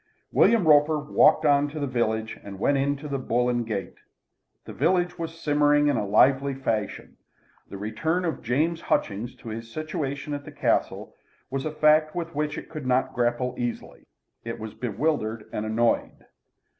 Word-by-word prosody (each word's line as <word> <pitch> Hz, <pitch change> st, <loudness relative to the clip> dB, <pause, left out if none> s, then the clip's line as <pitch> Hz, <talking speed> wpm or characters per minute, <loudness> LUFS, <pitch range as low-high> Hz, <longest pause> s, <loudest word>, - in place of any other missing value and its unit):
William 225 Hz, -8 st, +4 dB
Roper 150 Hz, +1 st, +5 dB
walked 150 Hz, +1 st, +3 dB
on 145 Hz, 0 st, +4 dB
to 150 Hz, +2 st, -7 dB
the 145 Hz, -, -1 dB
village 110 Hz, -3 st, -1 dB
and 100 Hz, -1 st, -8 dB
went 140 Hz, +8 st, +2 dB
into 140 Hz, +2 st, -1 dB
the 140 Hz, -2 st, -2 dB
"Bull 125 Hz, -1 st, 0 dB
and 120 Hz, -2 st, -1 dB
Gate." 100 Hz, -5 st, -4 dB, 0.7 s
The -, -, -8 dB
village 175 Hz, -1 st, +1 dB
was 165 Hz, 0 st, -5 dB
simmering 145 Hz, -1 st, +3 dB
in 145 Hz, -, +2 dB
a -, -, +1 dB
very 100 Hz, -1 st, -4 dB
lively 135 Hz, +5 st, +4 dB
fashion. 110 Hz, -6 st, -3 dB, 0.5 s
The 100 Hz, -, -7 dB
return 160 Hz, -, -1 dB
of 165 Hz, -, -2 dB
James 160 Hz, +8 st, 0 dB
Hutchings 105 Hz, +5 st, -1 dB
to 115 Hz, -, -10 dB
his 115 Hz, +1 st, -7 dB
situation 150 Hz, -1 st, -4 dB
at 145 Hz, 0 st, -4 dB
the -, -, -10 dB
Castle -, -, -1 dB, 0.4 s
was 135 Hz, +1 st, -2 dB
a 155 Hz, -, -2 dB
fact 155 Hz, 0 st, +3 dB
with 170 Hz, -1 st, -4 dB
which 150 Hz, 0 st, -2 dB
it -, -, -7 dB
could 155 Hz, -5 st, -7 dB
not 130 Hz, +1 st, +1 dB
grapple 120 Hz, +1 st, 0 dB
easily. 120 Hz, -1 st, -5 dB, 0.4 s
It 115 Hz, 0 st, -5 dB
was 110 Hz, -1 st, -7 dB
bewildered 115 Hz, -2 st, -2 dB
and 110 Hz, -, -3 dB
annoyed. 115 Hz, +2 st, 0 dB
140 Hz, 175 wpm, -25 LUFS, 115-155 Hz, 0.7 s, Roper